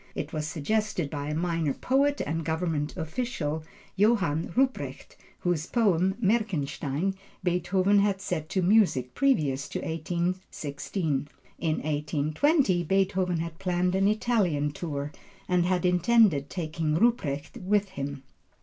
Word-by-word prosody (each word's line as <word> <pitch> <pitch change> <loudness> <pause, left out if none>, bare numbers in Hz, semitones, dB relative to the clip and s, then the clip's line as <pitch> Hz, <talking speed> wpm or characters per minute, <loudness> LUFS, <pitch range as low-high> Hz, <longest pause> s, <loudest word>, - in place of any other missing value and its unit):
It 150 - -4
was 155 -1 -2
suggested 180 0 -1
by 145 -2 -4
a 150 - -2
minor 165 -4 0
poet 280 +2 +1
and 160 +2 -2
government 160 -1 -2
official, 160 -3 -3 0.3
Johann 195 -7 +2
Ruprecht, 270 - -1 0.3
whose 175 -2 0
poem, 190 -5 +2
Merkenstein, 180 - 0 0.3
Beethoven 185 +3 +2
had 200 -1 +2
set 170 -5 -3
to 185 - 0
music 175 - +3
previous 145 - +1
to - - -3
1816. 160 -3 -2 0.3
In 160 -2 +1
1820 155 - +1
Beethoven 185 0 +1
had 165 0 -5
planned 180 -1 0
an 195 +1 +3
Italian 205 -10 +1
tour 145 -2 -4 0.4
and 180 -1 +2
had 180 -1 +1
intended 180 -5 +4
taking 160 -3 -2
Ruprecht 160 - 0
with 200 +1 +1
him. 140 -6 -5
175 Hz, 120 wpm, -27 LUFS, 150-195 Hz, 0.4 s, intended